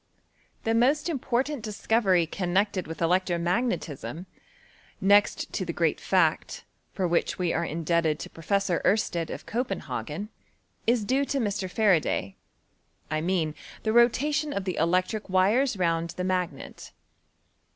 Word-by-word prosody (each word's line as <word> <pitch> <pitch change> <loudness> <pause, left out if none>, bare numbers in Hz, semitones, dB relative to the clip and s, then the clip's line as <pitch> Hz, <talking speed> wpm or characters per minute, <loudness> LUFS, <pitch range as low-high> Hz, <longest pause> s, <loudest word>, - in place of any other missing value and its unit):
The 225 - +1
most 275 +8 +2
important 270 -1 -1
discovery 210 -4 +1
connect 190 +4 0
ed 185 - -3
with 165 +1 -4
electro 180 +1 +2
magnetism, 170 - -2 0.7
next 205 +2 +3
to - - -1
the - - -4
great - - +1
fact, - - +1 0.3
for 185 -2 -1
which 170 0 0
we 180 -2 0
are 170 - 0
indebted 165 -1 0
to - - -7
Professor 185 +2 0
^rstedt 175 -5 +1
of - - -7
Copenhs^n, 195 - -4 0.6
is 230 -2 +2
due 265 +5 +2
to 280 - -2
Mr. 205 -6 -1
Faraday; 180 - +1 0.8
I 155 0 0
mean 165 -3 0 0.3
the 220 - 0
rotation 290 +5 +3
of 200 - -2
the 185 -3 -2
electric 185 +6 0
wires 205 +7 +3
round 170 -2 0
the 180 - -2
magnet. 180 -6 -3
185 Hz, 135 wpm, -27 LUFS, 170-225 Hz, 0.8 s, next